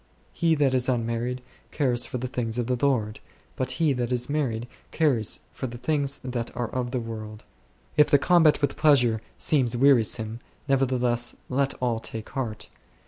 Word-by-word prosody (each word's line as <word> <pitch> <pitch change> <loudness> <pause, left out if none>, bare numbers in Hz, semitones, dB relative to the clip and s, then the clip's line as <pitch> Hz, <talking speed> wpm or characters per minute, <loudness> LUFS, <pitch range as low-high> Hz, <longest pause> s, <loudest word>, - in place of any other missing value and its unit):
"He 165 -1 +2
that 140 -3 +2
is 125 0 +1
unmarried 120 +1 -1 0.3
careth 125 -5 +1
for - - -4
the 125 - -4
things 120 -2 -3
of 120 - 0
the 125 +1 0
Lord; 110 -6 +1 0.4
but 130 0 -1
he 150 +1 +2
that 125 -1 -2
is 125 +2 -1
married 120 -6 -1 0.2
careth 130 -10 +1
for 130 - -5
the 120 0 -8
things 140 +2 0
that 125 -2 -3
are 120 -2 -2
of 125 -1 -2
the 125 0 -2
world 110 -2 -7
s." - - -32 0.5
If 150 - +6
the 145 - +6
combat 160 0 +4
with 145 - 0
pleasure 125 -8 +4 0.2
seems 125 -6 +1
wearisome, 115 -4 +3 0.3
nevertheless 125 -3 +1
let 135 +1 0
all 120 -3 -1
take 115 -1 -6
heart. 120 -5 -4
125 Hz, 175 wpm, -26 LUFS, 115-140 Hz, 0.5 s, If